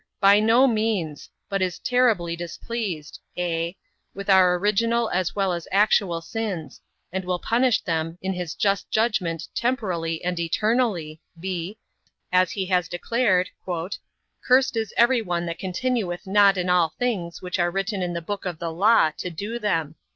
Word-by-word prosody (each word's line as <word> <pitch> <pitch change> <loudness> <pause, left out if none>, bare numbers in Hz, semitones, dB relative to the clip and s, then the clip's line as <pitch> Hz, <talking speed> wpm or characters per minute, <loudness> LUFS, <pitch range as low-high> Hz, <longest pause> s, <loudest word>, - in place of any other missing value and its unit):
A. - - -47
By 200 +1 +6
no 225 +5 +5
means; 215 - -1 0.2
but 195 -1 -2
is 180 -2 -1
terribly 230 -10 +1
displeased 175 -2 -5 0.2
(a) 170 0 -2 0.4
with 200 +1 -1
our 185 -2 +6
original 225 +4 +1
as 180 -1 -1
well 195 -3 +1
as 170 -1 -5
actual 195 -4 +3
sins; 195 -4 -5 0.3
and 190 0 -2
will 180 0 -1
punish 240 +4 +2
them 165 -1 -2
in 190 0 -2
his 180 -3 -5
just 200 -1 0
judgment 180 -8 0
temporally 180 -10 -1
and 175 -1 -1
eternally, 175 -3 0 0.2
(b) 185 +2 -4 0.5
as 185 -1 +4
he 195 -2 -2
has 180 -2 +1
declared, 185 0 +1 0.9
"Cursed 255 -1 +3
is 220 -2 -2
every 240 +1 +4
one 175 -4 -2
that 170 0 -5
continueth 190 -1 -2
not 200 0 +5
in 180 0 -1
all 175 -3 +2
things, 195 -10 -2
which 180 0 -3
are 175 0 +2
written 195 +2 -2
in 175 -1 -2
the 170 -1 -4
book 200 +3 -5
of 175 -3 -4
the 165 0 -4
law, 195 -1 +4
to 180 - -3
do 205 +8 -5
them." 165 -8 -1
185 Hz, 165 wpm, -24 LUFS, 170-215 Hz, 0.9 s, By